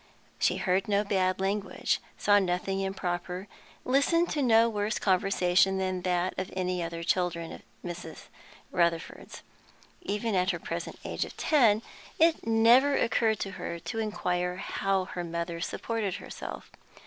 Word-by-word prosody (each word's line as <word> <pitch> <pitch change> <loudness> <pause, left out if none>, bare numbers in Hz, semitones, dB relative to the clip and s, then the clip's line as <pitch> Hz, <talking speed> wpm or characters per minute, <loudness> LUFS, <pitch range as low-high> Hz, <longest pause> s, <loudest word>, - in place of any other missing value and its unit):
She - - +2
heard 185 0 +1
no 205 0 +2
bad 190 -2 +1
language, 200 +1 -1 0.2
saw 205 0 +4
nothing 190 +1 -1
improper, 185 -1 -3 0.4
listened 310 +6 +2
to 295 - 0
no 230 -3 +5
worse 210 -1 -1
conversation 190 -1 +3
than 185 -1 -1
any 180 0 -1
of 165 - -2
the 170 - -8
other 165 - -5
children 170 -2 0
at - - -9 0.2
Miss 175 -1 -6 0.6
Rutherford's. 170 -2 -1 0.6
Even 225 - -2
at 185 -1 +2
her 175 - -1
present 170 +1 -5
age - - -1
of - - -9
ten 230 -8 +4 0.3
it 320 -7 +3
never 235 +5 +5
occurred 225 -2 +2
to 195 - -3
her 170 -3 -5
to 225 +7 -5
inquire 180 -4 -1
how 195 0 -1
her 180 -1 -5
mother 170 0 -4
supported 215 -1 -2
herself. - - -8
190 Hz, 145 wpm, -29 LUFS, 180-220 Hz, 0.6 s, no